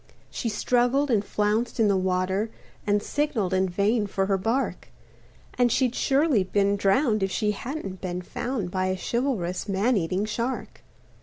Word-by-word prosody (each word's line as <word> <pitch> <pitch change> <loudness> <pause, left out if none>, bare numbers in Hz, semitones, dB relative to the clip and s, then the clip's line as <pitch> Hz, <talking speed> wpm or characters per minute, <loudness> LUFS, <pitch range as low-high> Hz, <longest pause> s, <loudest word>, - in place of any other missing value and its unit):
She 235 - -2
struggled 245 +5 +1
and 210 -3 +3
flounced 215 +4 -1
in 220 - +5
the 200 - +3
water 190 +3 0 0.4
And 205 0 +2
signaled 250 -11 -1
in 190 0 +2
vain 205 +4 +1
for 195 -1 0
her 195 0 +1
bark, 230 +8 -1 0.7
And 245 -1 +4
she'd 250 -1 +2
surely 275 - +2
been 200 +1 +1
drowned 215 +3 +2
if 195 - +1
she 210 +2 0
hadn't 210 - -6
been 180 -1 -4
found 230 -2 -3
By 185 0 0
a 185 0 -1
chivalrous 215 -6 -2
man 205 +5 +2
eating 185 +3 0
shark. 235 +4 -4
210 Hz, 160 wpm, -26 LUFS, 190-245 Hz, 0.7 s, in